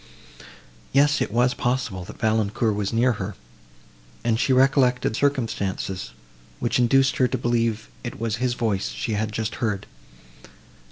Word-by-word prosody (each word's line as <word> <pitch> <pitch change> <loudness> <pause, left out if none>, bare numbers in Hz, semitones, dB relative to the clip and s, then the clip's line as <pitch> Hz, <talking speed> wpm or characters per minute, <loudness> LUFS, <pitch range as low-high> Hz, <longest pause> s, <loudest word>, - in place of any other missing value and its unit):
Yes, 145 +1 +4
it - - -1
was 125 +3 +3
possible, 120 -8 -1
that - - -10
Valancourt 110 0 +1
was 100 -1 -2
near 120 +3 +3
her, 95 +1 -4 0.9
and 115 -1 +1
she 135 - +1
recollected 130 -3 +3
circumstances, 100 - -1 0.5
which - - 0
induced 135 +2 +3
her 130 - +4
to 130 - -2
believe 115 -2 0 0.2
it 120 - -6
was 115 0 -1
his 125 0 0
voice 105 -5 -1
she 115 - -3
had 105 +1 -1
just 110 0 -3
heard. 105 -5 -1
115 Hz, 145 wpm, -24 LUFS, 105-125 Hz, 0.9 s, Yes